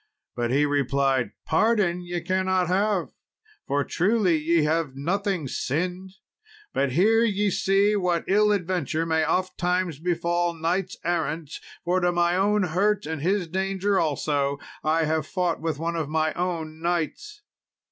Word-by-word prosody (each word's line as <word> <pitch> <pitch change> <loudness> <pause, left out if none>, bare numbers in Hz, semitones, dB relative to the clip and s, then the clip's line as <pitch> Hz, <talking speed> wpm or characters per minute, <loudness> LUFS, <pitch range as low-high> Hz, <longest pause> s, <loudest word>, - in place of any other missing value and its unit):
But 120 -1 -1
he 140 +4 +3
replied, 140 -3 +1 0.2
"Pardon 190 -1 +2
ye 175 -1 -4
cannot 185 0 +1
have, 195 +1 +1 0.6
for, 140 +1 +1
truly, 190 - +2
ye 160 +1 +2
have 155 -3 0
nothing 180 +2 -1
sinned; 180 +9 -3 0.6
but 135 -2 0
here 220 - +4
ye 205 -2 +1
see 195 +3 +2
what 180 -4 0
ill 210 +2 +4
adventure 175 -5 -1
may 160 -1 +1
ofttimes 180 -2 0
befall 175 0 0
knights 175 +4 -2
errant, 165 -3 -1 0.3
for 180 +2 +2
to 175 -1 +2
my 175 0 +2
own 205 +2 +2
hurt, 195 +4 +1
and 160 -1 -4
his 185 +2 0
danger 195 +2 0
also, 145 -2 0 0.3
I 160 +1 +2
have 155 -1 -1
fought 180 -4 -1
with 160 -3 -2
one 165 +2 -2
of 160 -3 -2
my 155 0 0
own 165 -3 -3
knights." 175 - -3
175 Hz, 145 wpm, -25 LUFS, 155-190 Hz, 0.6 s, here